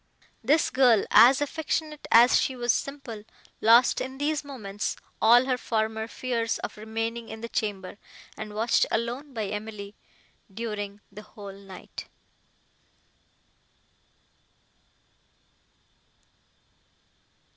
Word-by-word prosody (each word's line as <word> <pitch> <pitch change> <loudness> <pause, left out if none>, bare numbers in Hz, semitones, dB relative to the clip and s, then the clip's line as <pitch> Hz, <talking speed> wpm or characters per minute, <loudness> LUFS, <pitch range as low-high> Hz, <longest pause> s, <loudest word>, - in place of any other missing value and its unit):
This 300 +2 +3
girl, 245 -5 +4
as 260 +4 +7
affectionate 305 +1 -3
as 235 +2 +6
she 265 - -1
was 240 -1 +1
simple, 265 -7 -5 0.4
lost 235 +3 +5
in 260 +1 -5
these 295 +1 -1
moments 215 -8 -4 0.3
all 240 +3 +6
her 255 -1 0
former 220 -1 -1
fears 230 -1 -2
of - - -5
remaining 225 +2 -4
in 220 0 -8
the 230 - -4
chamber, 200 -4 -3 0.4
and 215 -1 -8
watched 225 +2 +2
alone 240 +6 -2
by 225 -4 -3
Emily, 210 0 -6 0.6
during 205 -1 -5
the 210 - -10
whole 205 -2 -11
night. 195 -1 -11
230 Hz, 105 wpm, -27 LUFS, 210-255 Hz, 0.6 s, as